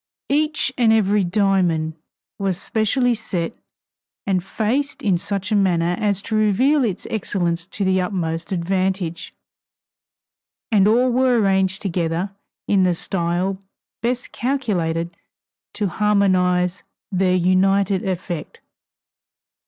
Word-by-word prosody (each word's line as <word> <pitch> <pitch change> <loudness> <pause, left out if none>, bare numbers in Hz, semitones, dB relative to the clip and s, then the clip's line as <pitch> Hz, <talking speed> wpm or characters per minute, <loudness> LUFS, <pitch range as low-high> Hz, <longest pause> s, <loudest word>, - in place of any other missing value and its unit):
Each 300 -2 0
and 230 -2 +5
every 210 -2 +3
diamond 180 -4 +1 0.5
was 195 -2 -1
specially 240 +5 +1
set 185 -7 -3 0.7
and 185 -3 0
faced 255 +9 -2
in 190 -5 +2
such 195 +2 -3
manner 180 -4 +2
as 200 -2 0
to 220 - -3
reveal 250 +8 +3
its 200 -6 -2
excellence 175 -5 -1
to 200 - -3
the 185 0 +2
utmost 175 -2 -3
advantage, 185 -1 -1 1.4
and 205 -2 +5
all 245 +4 +3
were 250 -1 +3
arranged 190 -1 +1
together 175 0 -1 0.4
in 200 -2 +3
the 180 -1 +3
style 180 +2 -1 0.4
best 245 +1 -2
calculated 175 -11 -1 0.6
to 210 - -1
harmonize 185 -3 +2 0.3
their 185 -1 +2
united 190 +2 +2
effect. 180 -4 -4
195 Hz, 110 wpm, -21 LUFS, 180-215 Hz, 1.4 s, and